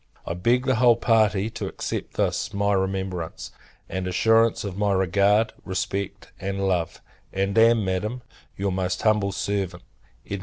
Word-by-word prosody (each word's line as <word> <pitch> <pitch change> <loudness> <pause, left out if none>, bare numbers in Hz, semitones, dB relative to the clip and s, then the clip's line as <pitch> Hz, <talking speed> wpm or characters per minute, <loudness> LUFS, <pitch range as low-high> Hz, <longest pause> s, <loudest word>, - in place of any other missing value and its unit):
I - - -3
beg 120 +9 +1
the 130 -3 +2
whole 120 0 +6
party 110 -2 +2
to 110 -3 -5
accept - - -5
this - - -1
my 100 0 +1
remembrance; 95 -3 -3 0.4
and 95 -1 -3
assurance 115 +5 +3
of 100 -3 -5
my 100 0 +1
regard, 100 +4 +2
respect, 95 +1 -4
and 100 0 -2
love: 90 -3 -1 0.3
and 95 +1 -1
am, 115 -1 +5
Madam, 105 +7 -2 0.3
your 100 0 -1
most 90 0 -2
humble 105 -2 +2
servant, 95 -3 -3 0.4
EDM. 100 - -4
100 Hz, 150 wpm, -24 LUFS, 95-110 Hz, 0.4 s, whole